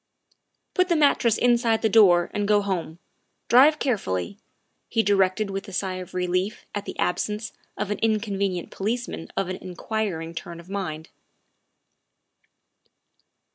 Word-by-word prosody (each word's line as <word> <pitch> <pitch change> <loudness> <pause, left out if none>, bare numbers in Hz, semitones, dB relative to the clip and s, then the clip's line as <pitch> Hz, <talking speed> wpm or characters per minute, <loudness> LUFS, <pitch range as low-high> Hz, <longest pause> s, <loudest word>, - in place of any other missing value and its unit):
' - - -42
' - - -51
Put 365 0 +2
the 340 - +3
mattress 280 -7 +3
inside 235 -2 +2
the - - +5
door 190 -6 +5
and 205 -1 -1
go 205 -1 +3
home; 175 -5 -3 0.5
drive 280 +6 +7
carefully, 200 - -2
' - - -47
' - - -48
he 225 - +2
directed 200 0 +2
with 195 +2 -5
a - - -8
sigh 185 0 -2
of 185 -1 -9
relief 180 +3 -1
at 205 -1 -4
the - - -7
absence 210 +4 -1 0.2
of 210 0 -2
an 210 - -2
inconvenient 200 -5 -1
policeman 225 -3 -3
of 195 - 0
an 185 0 -4
inquiring 180 -3 -4
turn 170 0 -7
of 170 +2 -14
mind. 160 -6 -4
200 Hz, 155 wpm, -25 LUFS, 180-220 Hz, 0.5 s, drive